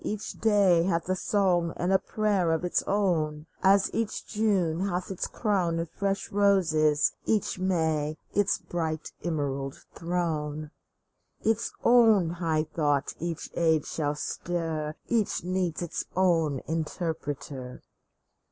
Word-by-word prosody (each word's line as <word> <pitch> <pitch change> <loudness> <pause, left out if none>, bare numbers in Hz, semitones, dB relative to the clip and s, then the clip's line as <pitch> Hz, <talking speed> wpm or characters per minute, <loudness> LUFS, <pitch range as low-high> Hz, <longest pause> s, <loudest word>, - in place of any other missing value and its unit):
Each 210 0 -3
day 200 -6 +4
Hath 170 -1 0
a 185 - +2
song 180 -4 +1
and 180 +2 +1
a 190 - +5
prayer 205 -6 0
of 160 +2 -1
its 175 - +1
own, 160 -7 0 0.2
As 195 0 +4
each 225 -2 -2
June 195 -7 +1
hath 180 +1 -3
its 190 - -2
crown 185 -7 0
of 165 -1 -3
fresh 195 0 -2
roses, 165 -7 +3 0.2
each 210 -4 0
May 160 -5 0 0.2
Its 205 0 +2
bright 160 -3 -4
emerald 140 -5 -2 0.2
throne! 155 -3 -2 0.7
Its 225 0 0
own 225 -8 +5
high 165 -3 0
thought 145 -3 0
each 170 -1 -4
age 160 -3 +2
shall 150 -2 -2
stir, 160 -1 -3
Each 225 -7 0
needs 180 -2 -1
its 170 - -4
own 165 -7 +2
interpreter 150 -5 -4
170 Hz, 125 wpm, -28 LUFS, 155-195 Hz, 0.7 s, a